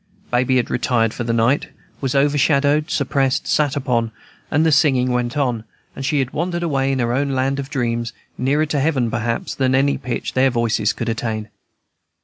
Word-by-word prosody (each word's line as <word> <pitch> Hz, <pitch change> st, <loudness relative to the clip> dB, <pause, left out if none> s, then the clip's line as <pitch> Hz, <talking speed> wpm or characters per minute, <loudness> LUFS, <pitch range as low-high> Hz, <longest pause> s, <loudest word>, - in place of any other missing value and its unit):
Baby 130 Hz, +1 st, +2 dB
had 125 Hz, -, 0 dB
retired 120 Hz, -2 st, +1 dB
for -, -, -4 dB
the 115 Hz, -, -1 dB
night, 115 Hz, +5 st, +2 dB, 0.3 s
was 135 Hz, -1 st, -1 dB
overshadowed, 145 Hz, +2 st, +2 dB
suppressed, 135 Hz, -1 st, 0 dB
sat 145 Hz, -3 st, +1 dB
upon; 120 Hz, -5 st, 0 dB, 0.4 s
the 160 Hz, +3 st, +2 dB
singing 135 Hz, -4 st, +3 dB
went 125 Hz, +2 st, -1 dB
on, 125 Hz, -6 st, 0 dB, 0.3 s
and 135 Hz, -, -6 dB
she 145 Hz, +3 st, 0 dB
had 135 Hz, -2 st, 0 dB
wandered 175 Hz, +2 st, -2 dB
away 135 Hz, -4 st, 0 dB
into 130 Hz, -3 st, 0 dB
her 120 Hz, -, -1 dB
own 140 Hz, +2 st, 0 dB
land 135 Hz, +2 st, 0 dB
of 135 Hz, 0 st, -5 dB
dreams, 120 Hz, -5 st, -2 dB, 0.2 s
nearer 145 Hz, +4 st, +1 dB
to 150 Hz, -1 st, -1 dB
heaven, 135 Hz, -5 st, +1 dB
perhaps, 115 Hz, 0 st, -2 dB
than 130 Hz, -1 st, +1 dB
any 140 Hz, +1 st, +2 dB
pitch 125 Hz, -1 st, -4 dB
their 130 Hz, +1 st, +3 dB
voices 115 Hz, -3 st, +1 dB
could 120 Hz, -, -5 dB
attain. 110 Hz, -1 st, -3 dB
130 Hz, 180 wpm, -20 LUFS, 120-140 Hz, 0.4 s, singing